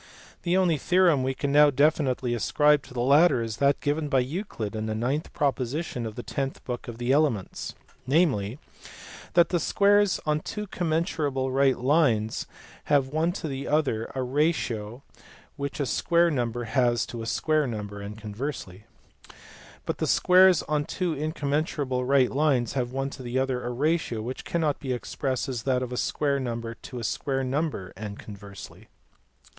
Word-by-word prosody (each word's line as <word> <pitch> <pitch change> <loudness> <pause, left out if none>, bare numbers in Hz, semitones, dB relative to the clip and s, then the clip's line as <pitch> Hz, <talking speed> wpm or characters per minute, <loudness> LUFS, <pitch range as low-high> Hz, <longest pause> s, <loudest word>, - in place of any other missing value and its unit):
The 180 +1 +1
only 180 -4 +3
theorem 175 -3 +3
we 130 +1 -1
can 140 +1 -2
now 150 +1 +7
definitely 135 -3 +1
ascribe 150 +5 +3
to - - -13
the 120 - -1
latter 140 0 +5
is 110 -1 -5
that 140 0 +2
given 150 +1 -1
by 135 -2 +3
Euclid 125 - -4
in 110 0 -3
the 110 - -2
ninth 130 +8 -2
proposition 140 -3 -2
of 110 - -8
the 120 - -6
tenth 135 -1 -4
book 125 -1 -5
of 120 -1 -7
the 120 +2 -1
Elements, 140 -9 0 0.3
namely, 130 - +2 0.8
that 170 -1 +5
the 175 - +1
squares 205 +3 +3
on 150 0 +1
two 210 +6 -5
commensurable 155 -7 -1
right 135 0 +3
lines 125 -6 +1 0.4
have 140 -2 +2
one 160 +4 +1
to 165 - -5
the 135 -1 -4
other 140 -7 +1
a 130 - -1
ratio 125 -4 -1 0.5
which 140 0 -5
a 140 - +1
square 170 +8 +2
number 120 -3 -1
has 120 0 +1
to 120 - -7
a 115 - -5
square 155 +4 +1
number 105 -3 -5
(and 105 +2 -7
conversely); 105 -3 -6 1.0
but - - -3
the - - 0
squares 185 -1 +5
on 150 -1 0
two 175 +3 -2
incommensurable 145 -3 -1
right 135 -1 +3
lines 135 -5 +1
have 125 -3 -1
one 135 +1 -2
to 135 - -9
the 120 -1 -6
j - - +1
other 130 -1 -1
a 120 - -3
ratio 145 -1 0
which 125 +3 -6
cannot 160 -4 0
be 130 -2 -2
expressed 130 -1 -3
as 125 -4 -3
that 130 +1 0
of 125 0 -5
a - - -2
square! 140 +1 0
number 115 -2 -4
to 125 +2 -10
a 120 - -5
square 135 +3 -1
number 130 - -2
(and 105 +1 -7
conversely). 100 -1 -11
135 Hz, 175 wpm, -26 LUFS, 120-150 Hz, 1.0 s, now